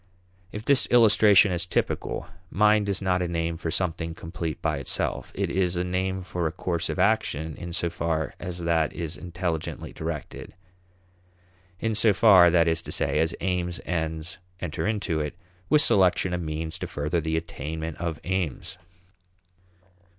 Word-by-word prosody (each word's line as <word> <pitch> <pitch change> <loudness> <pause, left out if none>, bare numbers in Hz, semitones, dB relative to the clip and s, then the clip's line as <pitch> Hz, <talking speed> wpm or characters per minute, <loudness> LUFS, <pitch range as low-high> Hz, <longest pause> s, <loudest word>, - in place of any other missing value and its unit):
If 105 +1 -7
this 140 -2 +4
illustration 105 -4 +6
is 90 0 -1
typical, - - -1 0.2
mind 105 0 +3
is 100 0 0
not 90 -1 +1
a 90 - 0
name 85 -1 -2
for 80 0 -4
something 80 -1 -2
complete 80 -2 -5
by - - -1
itself; - - -2
it - - -1
is 90 -1 +1
a 90 - 0
name 95 +1 -2
for 90 -2 -2
a - - -2
course 85 0 -2
of - - -3
action 90 -6 +1
in 85 - -7
so 85 0 -1
far 80 -2 -2
as 90 -1 -5
that 85 -2 +1
is 85 -2 -5
intelligently 85 -2 -4
directed; - - -6 1.2
in 115 -1 -1
so 110 0 +4
far, 95 -5 +7
that 85 -1 +4
is 80 0 +2
to - - -8
say, - - +1
as 80 +1 +1
aims, 90 -1 -1
ends, 80 +1 -3 0.2
enter 85 +3 -3
into 100 -7 -1
it, 75 +2 -3 0.3
with 150 - +5
selection 95 -1 +3
of 90 - -1
means 80 0 -3
to - - -4
further 75 +4 -1
the 80 +1 -1
attainment 80 0 -5
of 85 -2 -3
aims. 90 0 -3
85 Hz, 165 wpm, -26 LUFS, 80-95 Hz, 1.2 s, far